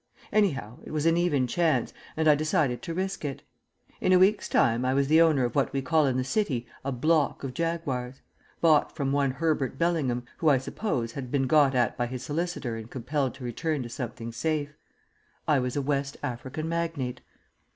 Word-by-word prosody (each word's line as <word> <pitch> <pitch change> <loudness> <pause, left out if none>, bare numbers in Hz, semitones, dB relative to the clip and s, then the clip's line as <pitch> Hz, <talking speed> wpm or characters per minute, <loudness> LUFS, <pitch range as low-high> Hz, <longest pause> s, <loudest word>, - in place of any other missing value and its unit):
Anyhow, 135 - +1
it - - -10
was 155 0 -2
an 165 0 +4
even 170 -7 +2
chance, 165 +5 +1 0.2
and 160 0 +2
I 150 - +8
decided 150 - +1
to 165 - -5
risk 190 0 -3
it. 140 -2 -4 0.6
In - - +1
a 185 - +7
week's 195 +3 +3
time 115 +2 +3
I 130 +1 +1
was 140 0 +2
the 160 +2 +6
owner 155 -6 +4
of 120 - -3
what 140 - +1
we 135 -1 -1
call 150 +2 +3
in 130 -1 0
the 130 - +1
City 135 - -1 0.2
a 135 - -2
"block" 150 +4 +1
of 135 -2 -4
Jaguars 135 -6 -2 0.5
bought 155 -3 +4
from 140 -3 -1
one 140 -1 +2
Herbert 135 -1 -1
Bellingham, 145 -8 0
who, 160 - +3
I 140 - +5
suppose, 130 - -2
had 130 0 -6
been 135 0 +1
got 140 0 +4
at 120 -2 +1
by 120 - +1
his 125 0 -6
solicitor 155 -6 -2
and 110 0 -8
compelled 130 +2 -2
to 130 - -11
return 140 +4 -2
to 120 - -7
something 115 -1 -5
safe. 145 +4 -2 0.7
I 150 -3 +4
was 125 -1 -2
a 145 - 0
West 140 0 -1
African 130 +6 -4
magnate. 165 -7 -2
140 Hz, 200 wpm, -27 LUFS, 125-160 Hz, 0.7 s, I